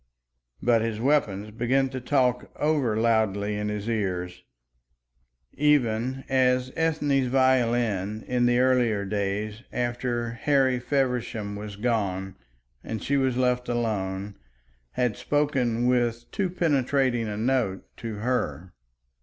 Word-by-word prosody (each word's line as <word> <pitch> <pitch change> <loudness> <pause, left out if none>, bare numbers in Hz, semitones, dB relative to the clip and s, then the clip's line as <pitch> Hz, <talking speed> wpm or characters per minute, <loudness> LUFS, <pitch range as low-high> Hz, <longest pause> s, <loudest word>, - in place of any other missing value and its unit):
But 120 -2 +4
his 110 -1 -2
weapons 110 -7 +1
began 130 +4 +1
to 130 -1 -5
talk 125 -2 +1
over 145 -8 +1
loudly 110 -3 +1
in 105 0 -2
his 105 0 -4
ears, 90 -5 -2 1.1
even 130 -3 +1
as 130 -1 +2
Ethne's 150 -5 +1
violin, 120 -6 +1
in 125 -1 +1
the 120 0 +3
earlier 125 -5 +2
days 105 +2 -2
after 120 -1 -2
Harry 130 +1 +2
Feversham 125 -6 -1
was 105 0 -7
gone 100 -4 -1 0.5
and 110 - -5
she 140 - 0
was 130 -3 +1
left 125 -1 +1
alone, 100 -4 -2 0.6
had 125 -4 0
spoken 130 -5 0
with 120 -1 0
too 195 -3 -1
penetrating 135 -8 +1
a 105 -1 -4
note 115 -4 0
to 115 -2 -5
her. 95 - -2
120 Hz, 120 wpm, -26 LUFS, 105-130 Hz, 1.1 s, But